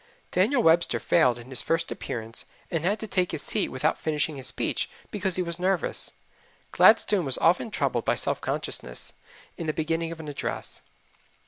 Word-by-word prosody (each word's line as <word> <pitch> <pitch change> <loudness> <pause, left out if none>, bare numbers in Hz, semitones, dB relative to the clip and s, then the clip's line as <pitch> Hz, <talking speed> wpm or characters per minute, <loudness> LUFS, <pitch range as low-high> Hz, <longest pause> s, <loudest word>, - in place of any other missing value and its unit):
Daniel 260 -4 +2
Webster 165 +1 +4
failed 125 -8 +3
in 120 +2 -12
his 125 - +4
first 165 0 0
appearance 115 -1 -5 0.2
and 165 -2 -1
had 200 +5 +1
to - - -3
take 185 -3 +1
his 155 - -1
seat - - +1
without 140 +5 0
finishing 155 0 -1
his 135 -2 -7
speech - - -1 0.2
because 190 -3 0
he 185 - +1
was 170 0 -2
nervous. 185 0 -1 0.6
Gladstone 210 -3 +5
was 135 - +5
often 175 +7 +2
troubled 135 - -1
with - - +2
self - - 0
consciousness - - -3 0.5
in 165 - -4
the 155 - 0
beginning 165 +1 -1
of 165 - -8
an 160 - -8
address. 145 - -5
165 Hz, 180 wpm, -26 LUFS, 140-180 Hz, 0.6 s, Gladstone